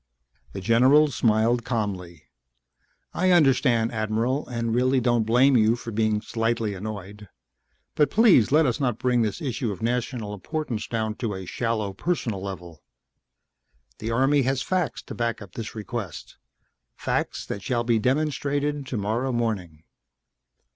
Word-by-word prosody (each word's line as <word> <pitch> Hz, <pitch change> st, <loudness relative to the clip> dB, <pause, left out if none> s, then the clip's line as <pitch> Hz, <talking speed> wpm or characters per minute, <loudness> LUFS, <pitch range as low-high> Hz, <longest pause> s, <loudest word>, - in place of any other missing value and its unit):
The -, -, -5 dB
general 130 Hz, +8 st, +5 dB
smiled 115 Hz, 0 st, +2 dB
calmly. 95 Hz, -9 st, -3 dB, 0.9 s
"I 185 Hz, +1 st, +1 dB
understand, 130 Hz, -8 st, +3 dB
Admiral, 115 Hz, +5 st, -1 dB
and 115 Hz, -2 st, -2 dB
really 130 Hz, +2 st, +3 dB
don't 120 Hz, -2 st, +1 dB
blame 130 Hz, +4 st, +5 dB
you 110 Hz, 0 st, +4 dB
for 120 Hz, -1 st, -7 dB
being 110 Hz, -1 st, +1 dB
slightly 115 Hz, -1 st, -1 dB
annoyed. 100 Hz, 0 st, -7 dB, 0.6 s
But, 150 Hz, -, +2 dB
please 195 Hz, -, +5 dB
let 155 Hz, +2 st, +5 dB
us 125 Hz, +1 st, 0 dB
not 125 Hz, -6 st, 0 dB
bring 125 Hz, -1 st, +1 dB
this 110 Hz, +5 st, -2 dB
issue 125 Hz, -4 st, -2 dB
of 100 Hz, -, -7 dB
national 120 Hz, -2 st, -2 dB
importance 120 Hz, -, -4 dB
down 110 Hz, -2 st, -2 dB
to 110 Hz, -5 st, -3 dB
a 95 Hz, 0 st, -7 dB
shallow 110 Hz, 0 st, -2 dB
personal 115 Hz, -, -2 dB
level. 90 Hz, -5 st, -8 dB, 1.2 s
The 110 Hz, -, -4 dB
Army 135 Hz, +5 st, +3 dB
has 135 Hz, +1 st, 0 dB
facts 185 Hz, -5 st, -1 dB
to -, -, -8 dB
back 115 Hz, -1 st, -2 dB
up 100 Hz, -4 st, -11 dB
this 110 Hz, +1 st, -7 dB
request 110 Hz, -2 st, -6 dB, 0.6 s
facts -, -, -2 dB
that 100 Hz, -, -5 dB
shall 120 Hz, +2 st, -1 dB
be 115 Hz, -1 st, +2 dB
demonstrated 145 Hz, +2 st, -1 dB
tomorrow 115 Hz, +3 st, -1 dB
morning." 100 Hz, -10 st, -3 dB
115 Hz, 140 wpm, -25 LUFS, 105-130 Hz, 1.2 s, general